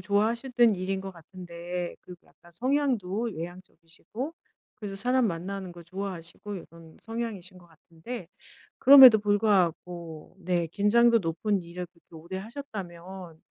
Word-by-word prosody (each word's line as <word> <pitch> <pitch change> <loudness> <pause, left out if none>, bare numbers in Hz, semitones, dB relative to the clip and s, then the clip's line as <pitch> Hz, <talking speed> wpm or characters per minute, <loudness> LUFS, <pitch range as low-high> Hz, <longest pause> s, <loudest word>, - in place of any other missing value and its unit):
좋아하셨던 230 +4 +2
일인 190 +1 -2
것 195 - -6
같은데 175 0 -7
그리고 180 -1 -14
약간 175 - -21
성향도 240 - 0
외향적이시고 175 - -8 0.4
그래서 200 -2 -6
사람 250 +4 +2
만나는 185 +1 -4
거 175 0 -12
좋아하시고 185 +2 -7
이런 165 -3 -12
성향이신 220 -5 -5
것 175 - -18
같은데 165 +5 -10 0.5
그럼에도 260 -4 +10
불구하고 180 -6 0
네 175 -2 0
긴장도 230 +6 +4
높은 190 +3 -1
일을 175 +1 -7
그렇게 170 -1 -24
오래 170 +4 -7
하셨다면 190 - -8
190 Hz, 330 characters per minute, -27 LUFS, 170-220 Hz, 0.5 s, 그럼에도